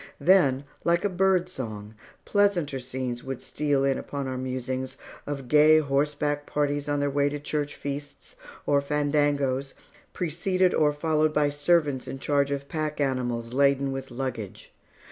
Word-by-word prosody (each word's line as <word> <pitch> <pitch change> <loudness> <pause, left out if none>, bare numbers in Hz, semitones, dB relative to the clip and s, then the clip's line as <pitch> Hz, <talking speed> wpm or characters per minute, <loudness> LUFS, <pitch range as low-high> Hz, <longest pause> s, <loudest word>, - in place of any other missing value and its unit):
Then, 145 -8 +4 0.2
like 170 +3 +2
a - - +2
bird 185 -1 +2
song, 110 - -7 0.3
pleasanter 180 -9 +1
scenes 125 -1 -4
would 135 -1 -5
steal 145 -2 0
in 135 -1 +1
upon 140 -2 -5
our 130 - -3
musings, 130 +1 -4 0.3
of 140 -3 -4
gay 150 +3 +6
horseback 145 0 0
parties 145 0 -1
on 145 0 +1
their 145 0 +1
way 140 0 +2
to 145 +1 -4
church 145 0 -3
feasts, 145 - -6 0.3
or 140 -1 +3
fandangos, 145 -2 0 0.4
preceded 180 +2 0
or 150 -1 +3
followed 155 0 +1
by 145 -1 +3
servants 145 -3 +1
in 130 +1 -5
charge 140 0 +1
of 140 0 -3
pack 155 -1 -3
animals 120 -4 -1
laden 140 0 +3
with 135 0 -5
luggage. 120 -5 -6
145 Hz, 150 wpm, -26 LUFS, 135-150 Hz, 0.4 s, gay